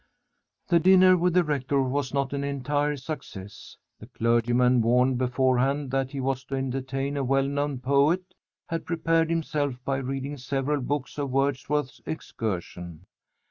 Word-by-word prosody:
The 170 Hz, -2 st, +5 dB
dinner 185 Hz, +1 st, +6 dB
with 180 Hz, 0 st, +1 dB
the 180 Hz, -, +5 dB
rector 140 Hz, -3 st, 0 dB
was 135 Hz, +1 st, -1 dB
not 140 Hz, -1 st, -1 dB
an 140 Hz, 0 st, -2 dB
entire 145 Hz, +1 st, -1 dB
success. 110 Hz, -9 st, -8 dB, 0.2 s
The -, -, -11 dB
clergyman, 120 Hz, +2 st, +2 dB
warned 125 Hz, +2 st, +3 dB
beforehand 130 Hz, +2 st, +1 dB
that 135 Hz, -1 st, 0 dB
he 140 Hz, 0 st, -6 dB
was 130 Hz, 0 st, -1 dB
to 135 Hz, -, -4 dB
entertain 135 Hz, +1 st, -2 dB
a 140 Hz, -, 0 dB
well 135 Hz, +1 st, +2 dB
known 145 Hz, 0 st, -1 dB
poet, 140 Hz, +8 st, +1 dB, 0.3 s
had 165 Hz, -1 st, -4 dB
prepared 165 Hz, -1 st, +1 dB
himself 150 Hz, -5 st, -1 dB
by 135 Hz, -1 st, 0 dB
reading 135 Hz, +2 st, -4 dB
several 135 Hz, +3 st, -1 dB
books 145 Hz, +2 st, -3 dB
of 140 Hz, -1 st, -2 dB
Wordsworth's 135 Hz, -1 st, -1 dB
Excursion. 90 Hz, -, -5 dB
135 Hz, 145 wpm, -26 LUFS, 130-145 Hz, 0.3 s, dinner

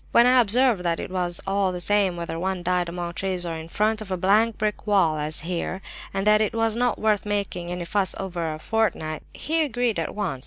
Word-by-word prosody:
"When 235 Hz, -, +7 dB
I 250 Hz, 0 st, +6 dB
observed 235 Hz, -1 st, +3 dB
that 170 Hz, -2 st, 0 dB
it -, -, -6 dB
was 175 Hz, -2 st, -1 dB
all 195 Hz, -1 st, +1 dB
the 180 Hz, -, -4 dB
same 195 Hz, -1 st, +2 dB
whether 170 Hz, -1 st, -4 dB
one 185 Hz, 0 st, -2 dB
died 180 Hz, -1 st, 0 dB
among 175 Hz, 0 st, -4 dB
trees 185 Hz, 0 st, -2 dB
or 170 Hz, -, -3 dB
in 160 Hz, 0 st, -8 dB
front 215 Hz, +4 st, 0 dB
of 210 Hz, -, -8 dB
a 185 Hz, -, -1 dB
blank 210 Hz, +5 st, +3 dB
brick 210 Hz, 0 st, -2 dB
wall, 175 Hz, -7 st, +3 dB
as 150 Hz, +1 st, 0 dB
here, 175 Hz, +2 st, -3 dB, 0.3 s
and 195 Hz, 0 st, -2 dB
that 210 Hz, 0 st, +5 dB
it 215 Hz, +1 st, 0 dB
was 225 Hz, -1 st, +1 dB
not 245 Hz, -1 st, +1 dB
worth 215 Hz, -2 st, +1 dB
making 200 Hz, -4 st, -2 dB
any 175 Hz, 0 st, -4 dB
fuss 190 Hz, +2 st, 0 dB
over 175 Hz, -4 st, -3 dB
a 155 Hz, -, -5 dB
fortnight, 160 Hz, -5 st, -1 dB
he 325 Hz, +1 st, 0 dB
agreed 245 Hz, -6 st, 0 dB
at -, -, -3 dB
once. 190 Hz, -11 st, -2 dB
195 Hz, 230 wpm, -24 LUFS, 175-215 Hz, 0.3 s, When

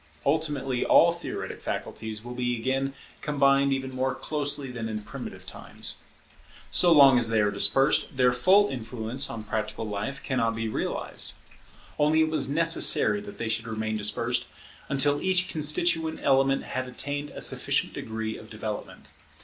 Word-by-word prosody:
Ultimately 140 Hz, -4 st, 0 dB
all -, -, +6 dB
theoretic -, -, -6 dB
faculties 110 Hz, -1 st, -5 dB
will 120 Hz, -, -6 dB
be 125 Hz, -1 st, -1 dB
again 135 Hz, +3 st, -1 dB, 0.3 s
combined 140 Hz, -1 st, +3 dB
even 135 Hz, -1 st, -2 dB
more 130 Hz, 0 st, -1 dB
closely 145 Hz, -3 st, -1 dB
than 115 Hz, -2 st, -5 dB
in 110 Hz, -1 st, -4 dB
primitive -, -, -8 dB
times. -, -, -3 dB, 0.7 s
So 175 Hz, -, +4 dB
long 140 Hz, -5 st, +7 dB
as 115 Hz, -1 st, +2 dB
they 110 Hz, -1 st, +2 dB
are 105 Hz, -1 st, +2 dB
dispersed, 130 Hz, +8 st, +2 dB
their 125 Hz, -1 st, +4 dB
full 190 Hz, +11 st, +4 dB
influence 120 Hz, +1 st, -2 dB
on 115 Hz, -2 st, -6 dB
practical 110 Hz, +1 st, -4 dB
life 105 Hz, +7 st, -4 dB
cannot 115 Hz, -4 st, 0 dB
be 115 Hz, 0 st, -2 dB
realized. 110 Hz, -, -3 dB, 0.7 s
Only 155 Hz, +2 st, +4 dB
it 160 Hz, 0 st, +1 dB
was 155 Hz, -, +1 dB
necessary 165 Hz, +6 st, +3 dB
that 205 Hz, 0 st, -10 dB
they 115 Hz, -, -3 dB
should 115 Hz, +1 st, -1 dB
remain 110 Hz, -1 st, -3 dB
dispersed 115 Hz, +4 st, -1 dB, 0.4 s
until 145 Hz, +1 st, +2 dB
each 185 Hz, 0 st, +1 dB
constituent 160 Hz, +1 st, +1 dB
element 135 Hz, 0 st, +3 dB
had 130 Hz, 0 st, -4 dB
attained 145 Hz, +3 st, -4 dB
a -, -, -9 dB
sufficient -, -, +1 dB
degree 110 Hz, 0 st, -5 dB
of -, -, -13 dB
development. -, -, -6 dB
130 Hz, 155 wpm, -26 LUFS, 115-145 Hz, 0.7 s, long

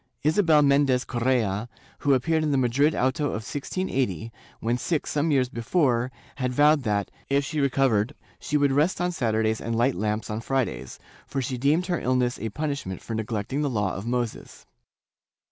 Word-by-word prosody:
Isabel 155 Hz, -1 st, +4 dB
Mendes 140 Hz, -2 st, +3 dB
Correa, 120 Hz, -3 st, 0 dB, 0.3 s
who 140 Hz, -1 st, +3 dB
appeared 160 Hz, +5 st, +1 dB
in 155 Hz, -, 0 dB
the 140 Hz, -, +2 dB
Madrid 135 Hz, +5 st, +2 dB
auto 130 Hz, +4 st, +1 dB
of 110 Hz, -6 st, -2 dB
1680, 130 Hz, -, -2 dB, 0.3 s
when 115 Hz, +2 st, 0 dB
sick 150 Hz, +5 st, -1 dB
some 150 Hz, +2 st, 0 dB
years 135 Hz, -4 st, +3 dB
before, 125 Hz, 0 st, 0 dB, 0.3 s
had 130 Hz, -2 st, -1 dB
vowed 150 Hz, +3 st, +4 dB
that, 105 Hz, -4 st, -1 dB, 0.2 s
if 140 Hz, 0 st, +2 dB
she 150 Hz, +1 st, -3 dB
recovered, 135 Hz, -3 st, +2 dB, 0.2 s
she 150 Hz, -, 0 dB
would 145 Hz, -1 st, +3 dB
rest 150 Hz, +7 st, +2 dB
on 180 Hz, 0 st, 0 dB
Saturdays 110 Hz, -7 st, 0 dB
and 115 Hz, 0 st, -2 dB
light 120 Hz, +4 st, +2 dB
lamps 105 Hz, +3 st, -2 dB
on 110 Hz, +1 st, -3 dB
Fridays, 115 Hz, -, -2 dB, 0.3 s
for 140 Hz, -, -3 dB
she 130 Hz, 0 st, -2 dB
deemed 150 Hz, +7 st, +2 dB
her 175 Hz, -2 st, -1 dB
illness 125 Hz, -1 st, 0 dB
a 110 Hz, -, -3 dB
punishment 140 Hz, -, -3 dB
for 115 Hz, -, -7 dB
neglecting 110 Hz, +4 st, -2 dB
the 145 Hz, -, 0 dB
Law 105 Hz, -6 st, 0 dB
of 100 Hz, +4 st, -6 dB
Moses. 120 Hz, -2 st, -3 dB
130 Hz, 175 wpm, -25 LUFS, 115-145 Hz, 0.3 s, Isabel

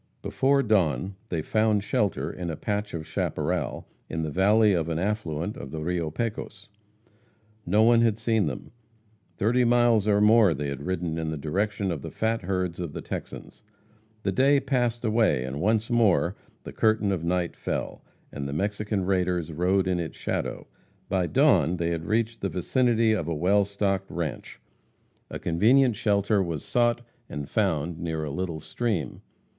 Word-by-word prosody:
Before 140 Hz, +1 st, +2 dB
dawn 95 Hz, -, +1 dB, 0.2 s
they 80 Hz, -3 st, -2 dB
found 110 Hz, 0 st, +1 dB
shelter 105 Hz, -3 st, -1 dB
in 90 Hz, -2 st, -5 dB
a 80 Hz, -, -3 dB
patch 105 Hz, +2 st, -3 dB
of 80 Hz, -2 st, -5 dB
chaparral -, -, -2 dB, 0.2 s
in 80 Hz, 0 st, -3 dB
the 80 Hz, -, -3 dB
valley 105 Hz, +4 st, +4 dB
of 85 Hz, -2 st, 0 dB
an 80 Hz, -, -1 dB
affluent 95 Hz, -1 st, -2 dB
of 70 Hz, -, -8 dB
the 80 Hz, +2 st, -5 dB
Rio 85 Hz, -1 st, -1 dB
Pecos. 105 Hz, +1 st, -5 dB, 1.0 s
No 105 Hz, +5 st, +4 dB
one 115 Hz, 0 st, +5 dB
had 115 Hz, -3 st, +2 dB
seen 110 Hz, -4 st, +1 dB
them. 65 Hz, -, -6 dB, 0.7 s
Thirty 120 Hz, +5 st, +2 dB
miles 120 Hz, -3 st, +3 dB
and 105 Hz, 0 st, +4 dB
more 105 Hz, -6 st, +5 dB
they 70 Hz, +1 st, -3 dB
had 70 Hz, -1 st, -5 dB
ridden 85 Hz, -3 st, -2 dB
in 80 Hz, -1 st, -2 dB
the 80 Hz, -, -3 dB
direction 100 Hz, +6 st, -1 dB
of 80 Hz, -5 st, -4 dB
the -, -, -6 dB
fat 115 Hz, +1 st, -1 dB
herds 90 Hz, -2 st, -2 dB
of 85 Hz, -4 st, -4 dB
the -, -, -5 dB
Texans. -, -, -7 dB, 0.6 s
The 100 Hz, -, 0 dB
day 140 Hz, +7 st, +4 dB
passed 120 Hz, -3 st, -1 dB
away, 110 Hz, -, +2 dB
and 65 Hz, +3 st, -5 dB
once 110 Hz, +4 st, +1 dB
more 105 Hz, -6 st, +3 dB, 0.3 s
the -, -, -8 dB
curtain 110 Hz, -2 st, +2 dB
of 90 Hz, -4 st, -2 dB
night 90 Hz, 0 st, -1 dB
fell, -, -, -4 dB, 0.3 s
and 70 Hz, -1 st, -5 dB
the 70 Hz, -, -4 dB
Mexican 100 Hz, +3 st, -1 dB
raiders 90 Hz, -3 st, 0 dB
rode 90 Hz, +4 st, +1 dB
in 90 Hz, -1 st, 0 dB
its 85 Hz, -2 st, -5 dB
shadow. -, -, -3 dB, 0.4 s
By 95 Hz, -2 st, +1 dB
dawn 90 Hz, -, +3 dB
they 85 Hz, 0 st, -1 dB
had 80 Hz, -1 st, -3 dB
reached 115 Hz, +3 st, -1 dB
the 100 Hz, -, -1 dB
vicinity 115 Hz, +4 st, +2 dB
of 90 Hz, -7 st, -1 dB
a 85 Hz, -, -1 dB
well 100 Hz, +6 st, +3 dB
stocked 100 Hz, -1 st, -1 dB
ranche. 85 Hz, -4 st, -5 dB, 0.7 s
A -, -, -5 dB
convenient 115 Hz, +9 st, +3 dB
shelter 100 Hz, -1 st, +1 dB
was 85 Hz, -5 st, -3 dB
sought 120 Hz, -1 st, +1 dB, 0.3 s
and 75 Hz, -1 st, -5 dB
found 85 Hz, -5 st, -1 dB
near 80 Hz, -2 st, -3 dB
a 75 Hz, -, -4 dB
little 85 Hz, +1 st, -3 dB
stream. 105 Hz, +2 st, -3 dB
95 Hz, 170 wpm, -26 LUFS, 85-110 Hz, 1.0 s, one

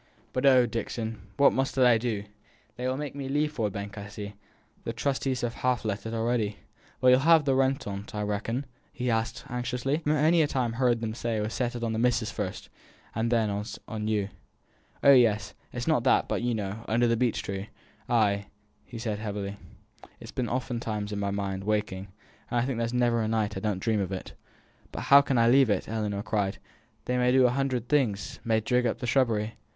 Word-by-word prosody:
But 130 Hz, +2 st, +2 dB
oh, 130 Hz, -2 st, +7 dB
Dixon, 115 Hz, -1 st, -4 dB, 0.2 s
what 140 Hz, -, +6 dB
must 135 Hz, +1 st, -1 dB
I 125 Hz, -3 st, +5 dB
do? 110 Hz, -4 st, -2 dB, 0.5 s
They 125 Hz, +2 st, -3 dB
will 130 Hz, +1 st, -1 dB
make 145 Hz, -1 st, -4 dB
me 140 Hz, -1 st, -5 dB
leave 150 Hz, +2 st, +1 dB
Ford 110 Hz, -8 st, -1 dB
Bank, 100 Hz, +1 st, -6 dB
I 100 Hz, -, -7 dB
see. 105 Hz, 0 st, -7 dB
I -, -, -4 dB
think 100 Hz, 0 st, -17 dB, 0.5 s
the 115 Hz, -, -2 dB
trustees 130 Hz, +1 st, -1 dB
have 120 Hz, -1 st, -1 dB
half 125 Hz, -3 st, 0 dB
let 105 Hz, +1 st, -2 dB
it 110 Hz, -, -5 dB
already." 115 Hz, -2 st, 0 dB, 0.4 s
"But 130 Hz, -, +5 dB
you'll 125 Hz, 0 st, +7 dB
have 160 Hz, +1 st, +5 dB
the 135 Hz, -, +3 dB
rent 135 Hz, +1 st, +1 dB
on't, 100 Hz, +1 st, -6 dB
I 105 Hz, -, -1 dB
reckon?" 110 Hz, +6 st, -2 dB, 0.3 s
asked 115 Hz, -2 st, -1 dB
he, -, -, -9 dB
anxiously. 125 Hz, +3 st, -1 dB
"I've 160 Hz, -, -7 dB
many 155 Hz, +3 st, +4 dB
a 150 Hz, -, +3 dB
time 125 Hz, -5 st, -1 dB
heerd 120 Hz, -1 st, +1 dB
'em 110 Hz, -1 st, -2 dB
say 115 Hz, 0 st, -2 dB
as -, -, 0 dB
it -, -, 0 dB
was 110 Hz, -, -3 dB
settled 120 Hz, -1 st, -2 dB
on 115 Hz, -1 st, -1 dB
the 110 Hz, -, -1 dB
missus 120 Hz, -2 st, +1 dB
first, 100 Hz, -4 st, -4 dB, 0.5 s
and 115 Hz, +1 st, -1 dB
then 110 Hz, -3 st, +2 dB, 0.4 s
on 110 Hz, -1 st, -4 dB
you." 105 Hz, -2 st, 0 dB, 0.7 s
"Oh, 140 Hz, -, +8 dB
yes, 110 Hz, -7 st, +4 dB, 0.2 s
it -, -, -9 dB
is -, -, -3 dB
not -, -, +3 dB
that; -, -, +4 dB
but -, -, -1 dB
you 120 Hz, -1 st, 0 dB
know, 105 Hz, +1 st, -4 dB
under 120 Hz, +2 st, +2 dB
the 115 Hz, 0 st, +3 dB
beech 120 Hz, 0 st, 0 dB
tree 100 Hz, +1 st, -5 dB, 0.3 s
" -, -, -31 dB
"Ay!" 100 Hz, -4 st, +2 dB, 0.5 s
said 110 Hz, -2 st, -3 dB
he, -, -, -7 dB
heavily. 100 Hz, -1 st, -4 dB, 0.6 s
"It's -, -, -10 dB
been 125 Hz, -2 st, -2 dB
oftentimes 115 Hz, -4 st, -3 dB
on 100 Hz, -, -3 dB
my 100 Hz, 0 st, -1 dB
mind, 100 Hz, -1 st, -3 dB
waking, 105 Hz, -2 st, -1 dB, 0.4 s
and 120 Hz, -, +1 dB
I 120 Hz, -, +1 dB
think 130 Hz, -3 st, -2 dB
there's 115 Hz, 0 st, -1 dB
ne'er 120 Hz, -1 st, +2 dB
a 110 Hz, -, 0 dB
night 110 Hz, -1 st, 0 dB
as 95 Hz, -, -5 dB
I -, -, +1 dB
don't 100 Hz, -, -1 dB
dream 110 Hz, +2 st, 0 dB
of 100 Hz, -1 st, -2 dB
it." 95 Hz, -, -5 dB, 0.6 s
"But -, -, -5 dB
how 140 Hz, 0 st, +7 dB
can 135 Hz, -2 st, 0 dB
I 115 Hz, 0 st, +5 dB
leave 130 Hz, 0 st, +5 dB
it!" 100 Hz, -3 st, 0 dB
Ellinor 105 Hz, -2 st, -2 dB
cried. 100 Hz, -2 st, -1 dB, 0.5 s
"They 125 Hz, 0 st, 0 dB
may 125 Hz, 0 st, +3 dB
do 130 Hz, 0 st, +5 dB
a 125 Hz, -, +4 dB
hundred 130 Hz, -2 st, -1 dB
things 120 Hz, -9 st, 0 dB
may 110 Hz, -2 st, +2 dB
dig 125 Hz, +2 st, +1 dB
up 115 Hz, -, -1 dB
the 125 Hz, -, -5 dB
shrubbery. 115 Hz, -4 st, +1 dB
115 Hz, 225 wpm, -28 LUFS, 105-125 Hz, 0.7 s, Oh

